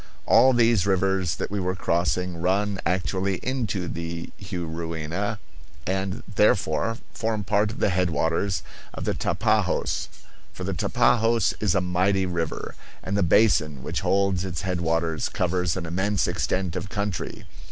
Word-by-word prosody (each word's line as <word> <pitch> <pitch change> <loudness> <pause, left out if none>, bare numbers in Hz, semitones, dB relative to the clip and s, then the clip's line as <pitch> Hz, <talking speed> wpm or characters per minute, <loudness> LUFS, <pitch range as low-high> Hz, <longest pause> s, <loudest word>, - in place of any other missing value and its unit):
All 130 - +6
these 115 -5 +3
rivers 95 -2 +1
that - - -4
we 105 - -1
were 90 0 -1
crossing 85 0 0
run 100 +2 +1
actually 95 +2 0
into 115 -8 -1
the 85 0 -5
Juruena, 85 +2 -3 0.5
and 95 +3 -2
therefore 105 0 +2 0.2
form 110 -2 -1
part 105 +1 +2
of 110 - -8
the 100 - +2
headwaters 85 0 0 0.3
of - - -5
the - - +1
Tapajos; - - 0 0.5
for - - -7
the - - -2
Tapajos 115 -1 +2
is 105 -5 +1
a 95 - +3
mighty 95 +2 +1
river, 85 -3 -3 0.3
and 95 - -2
the 100 - +2
basin 80 - +3
which - - -2
holds 95 -2 +2
its 90 -1 -4
headwaters 85 -3 0
covers 90 -1 0
an 90 - -3
immense 95 +4 0
extent 95 -3 -1
of 100 - -4
country. 100 -3 -3
95 Hz, 140 wpm, -25 LUFS, 85-100 Hz, 0.5 s, All